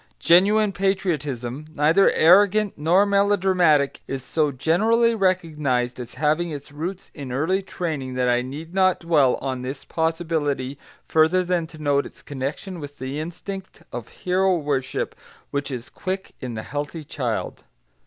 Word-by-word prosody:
Genuine 205 +4 +4
patriotism, 155 -9 -2
neither 160 +7 +5
arrogant 200 +4 +5
nor 170 +7 +3
melodramatic, 190 -7 +3
is 135 -2 -4
so 150 +2 0
generally 220 - +3
recognised 150 - 0
as 120 -1 -8
having 155 +3 +1
its 145 -2 -7
roots 175 +6 -6
in 140 -4 -7
early 160 +9 +1
training 155 -9 -4
that 125 0 +1
I 120 0 +3
need 150 +7 -7
not 185 -1 +3
dwell 150 -7 +3
on 130 -2 -2
this 130 +2 -6
possibility, 160 -5 -1 0.3
further 160 +4 +3
than 175 -2 0
to 160 - -14
note 145 -2 +1
its - - -18
connection 145 +7 -5
with 145 -1 -9
the 130 +3 -4
instinct 190 +4 -7
of 120 -2 -5
hero 185 0 +1
worship 140 -4 -2 0.4
which 140 0 -2
is 125 -2 -5
quick 190 +1 -4
in 125 -3 -5
the 110 - -5
healthy 145 +3 -5
child. 125 -6 -3
155 Hz, 145 wpm, -23 LUFS, 135-185 Hz, 0.4 s, neither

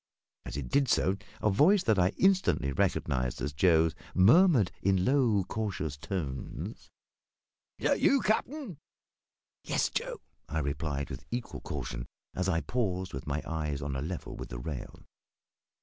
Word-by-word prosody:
As 65 - -5
it 70 -4 -4
did 140 -3 +2
so, 95 - +3 0.3
a 105 - +4
voice 175 - +5
that 110 -4 +3
I 90 0 +4
instantly 190 - +3
recognised 65 -2 0
as 70 +3 -3
Joe's 80 0 +4 0.2
murmured, 120 - +6
in 95 -1 +2
low, 120 -7 +3
cautious 95 -8 -3
tones 75 -4 -5 0.9
"Is - - 0
that - - +2
you, 275 - +5
cap'n?" 225 - -1 0.8
"Yes, - - +1
Joe," - - -3 0.3
I 80 - -2
replied, 70 -1 -2
with 65 +2 -7
equal 120 0 -4
caution, - - -5 0.3
as 90 +1 -1
I 85 -3 +1
paused 95 -7 -2
with 65 +1 -6
my 75 +2 -2
eyes 75 -3 -3
on 70 -1 -3
a 65 - -2
level 85 +3 -5
with - - -7
the - - -6
rail. 60 +2 -7
90 Hz, 150 wpm, -30 LUFS, 70-115 Hz, 0.9 s, murmured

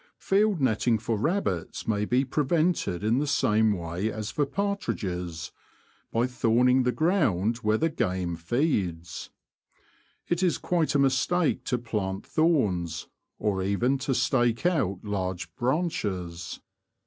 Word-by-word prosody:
Field 200 -1 +2
netting 120 -2 +2
for 110 +1 -2
rabbits 110 - -1
may 105 -2 +1
be 125 +5 +2
prevented 150 - 0
in 115 +4 +2
the 150 - -1
same 110 -5 +3
way 90 +4 -3
as 110 0 -4
for 145 -2 0
partridges 90 - -3 0.3
— - - -36
by 115 +2 +2
thorning 125 +1 +3
the 125 - +3
ground 120 - +1
where 110 -2 +1
the 165 - +2
game 90 - -1
feeds. 90 - -1 1.0
It 175 +1 0
is 180 -3 +2
quite 170 -4 0
a - - +6
mistake 140 +2 +2
to 125 - 0
plant 105 -5 -3
thorns, 95 - +1 0.3
or 100 -3 0
even 120 +8 +1
to 135 0 -1
stake 120 +1 +1
out 100 - +1
large 95 -3 -3
branches. 105 - -2
115 Hz, 135 wpm, -27 LUFS, 95-145 Hz, 1.0 s, a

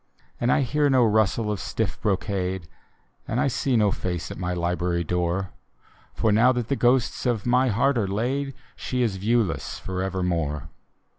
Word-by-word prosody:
And 120 +1 +2
I - - +3
hear 145 +3 +1
no 130 -3 +5
rustle 110 0 +2
of 105 - -2
stiff 110 +1 -3
brocade, 95 -3 -1 0.6
And 115 - -1
I - - +3
see 130 0 +1
no 105 -2 +3
face 90 -4 -3
at - - -7
my 90 -1 -2
library 85 0 -1
door; 90 +2 -1 0.6
For 110 - +2
now 115 +5 +5
that 120 -2 -3
the 140 - +2
ghosts 125 0 +2
of 115 -5 0
my 125 +2 +3
heart 125 +4 +2
are 100 - 0
laid. 130 +7 -2 0.2
She 125 -1 -2
is 105 -5 -1
viewless 110 -2 0
forevermore. 90 -5 -2
105 Hz, 165 wpm, -25 LUFS, 90-125 Hz, 0.6 s, no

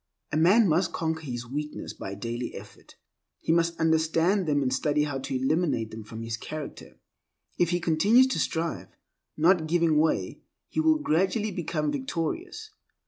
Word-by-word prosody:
A - - -1
man 190 +8 +5
must 165 +2 +1
conquer 160 0 -2
his 125 -5 -5
weaknesses 150 +5 -5
by 95 0 -6
daily 120 +4 -5
effort. - - -12 0.4
He - - -1
must 170 0 +1
understand 160 +4 +2
them 145 -2 +2
and 130 -1 0
study 150 +2 +1
how 145 -2 -3
to 135 0 -4
eliminate 135 -5 0
them 110 0 -8
from 110 +2 -8
his 115 0 -3
character. 155 +5 -8 0.6
If 175 - +3
he 175 0 +1
continues 200 +10 +4
to - - -1
strive, 160 - -2 0.5
not 165 0 +3
giving 165 -2 +3
way, 155 0 0 0.3
he - - -2
will 315 0 +4
gradually 205 - 0
become 155 -4 -2
victorious. 255 - -4
160 Hz, 160 wpm, -27 LUFS, 140-175 Hz, 0.6 s, man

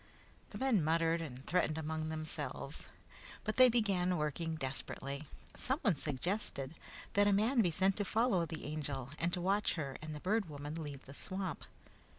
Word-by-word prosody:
The - - -7
men 255 -10 +3
muttered 165 +1 +2
and 135 -4 -7
threatened 160 -3 +2
among 160 0 -2
themselves, 155 0 -4 0.6
but 215 - -2
they 255 -1 +9
began 195 -6 +2
working 160 +2 -1
desperately. 140 0 -4 0.3
Someone 255 - +1
suggested 145 - -1 0.4
that 205 0 +5
a - - +5
man 225 +5 +4
be 180 - +3
sent 190 +3 +2
to 205 - +3
follow 215 -6 +2
the 160 -1 -6
Angel 145 -4 -2
and 170 +1 +1
to 180 - -1
watch 195 +4 +2
her 140 -5 -3
and 155 0 -5
the - - -5
Bird 200 +1 +1
Woman 145 0 -5
leave 145 -4 -6
the 135 - -10
swamp. 185 +4 -3
165 Hz, 165 wpm, -35 LUFS, 150-200 Hz, 0.6 s, they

